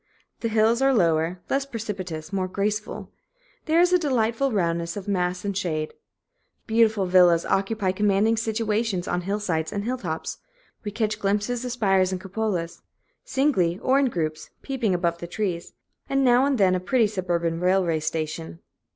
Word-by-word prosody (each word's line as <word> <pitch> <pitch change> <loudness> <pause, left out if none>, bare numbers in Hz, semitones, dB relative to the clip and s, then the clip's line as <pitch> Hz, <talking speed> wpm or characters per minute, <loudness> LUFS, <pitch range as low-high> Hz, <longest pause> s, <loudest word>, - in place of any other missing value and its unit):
The 230 - -1
hills 225 +2 +3
are 270 0 +4
lower, 165 -2 +1
less 275 0 0
precipitous, 195 - -6
more 190 -1 0
graceful. 210 +3 -3 0.5
There 320 +1 +3
is 355 +1 +4
a 360 - +5
delightful 260 -3 +1
roundness 170 -3 -1
of 200 0 -7
mass 180 -1 -1
and 200 -1 -2
shade. 155 -5 -2 0.7
Beautiful 220 -3 +3
villas 180 -2 +5
occupy 195 0 0
commanding 205 +3 +2
situations 220 -3 -1
on 180 - -1
hillsides 180 -4 -2
and 200 - -3
hilltops; 205 -9 -4 0.4
we 210 - -3
catch 215 0 -2
glimpses 210 +5 0
of 250 - -3
spires 195 -5 +2
and 185 - -2
cupolas, 190 -3 -3 0.4
singly 190 - +1
or 265 +6 +2
in 280 - +3
groups, 155 -7 -3
peeping 240 -8 0
above 170 -1 -1
the 170 - -6
trees; 175 -2 -3 0.4
and 275 0 +2
now 250 +1 +5
and 280 -2 +1
then 190 -3 +4
a 185 - +1
pretty 225 +6 +2
suburban 175 -5 -1
railway 180 -3 +2
station. 155 - -4
200 Hz, 160 wpm, -25 LUFS, 175-225 Hz, 0.7 s, a